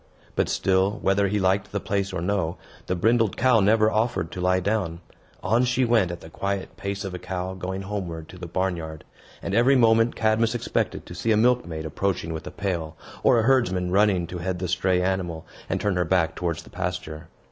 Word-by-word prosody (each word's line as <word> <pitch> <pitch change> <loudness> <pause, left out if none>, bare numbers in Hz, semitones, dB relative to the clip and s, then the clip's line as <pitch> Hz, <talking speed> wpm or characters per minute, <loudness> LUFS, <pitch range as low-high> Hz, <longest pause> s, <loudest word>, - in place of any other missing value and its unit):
But - - +1
still, 95 +2 +1
whether 100 +1 +3
he 105 +2 0
liked 95 +1 +1
the 100 - -1
place 100 0 -1
or 95 -3 -3
no, 90 -3 -1 0.3
the 90 - 0
brindled 110 +2 +2
cow 125 -2 +4
never 110 +2 +4
offered 110 -7 0
to 90 - -5
lie 90 +1 +3
down. 95 -4 -1 0.4
On 115 +3 +3
she 125 +1 +2
went 115 -6 +3
at 85 0 -6
the 80 - -11
quiet 100 +2 -3
pace 100 0 -4
of 95 - -5
a 90 - -5
cow 90 0 -4
going 95 +1 -4
homeward 90 -5 -5
to 90 - -11
the 85 - -6
barn 95 +2 0
yard; 80 -1 -7 0.4
and, 100 - -3
every 120 +5 +5
moment, 115 -1 +4
Cadmus 110 +1 +2
expected 120 - -2
to - - -9
see 115 - -1
a 105 - +4
milkmaid 110 -10 +1
approaching 85 0 -2
with 80 - -6
a - - -6
pail, 85 -6 -3 0.2
or - - +5
a 115 - +3
herdsman 100 -9 +2
running 95 -2 +3
to 90 +1 -6
head 90 +1 -2
the 90 +1 -3
stray 90 +1 +1
animal, 90 -4 -2 0.2
and - - 0
turn 100 -3 0
her 90 - +2
back 85 -1 +1
towards 85 -2 -2
the - - -16
pasture. 90 -3 -4
95 Hz, 210 wpm, -25 LUFS, 90-110 Hz, 0.4 s, every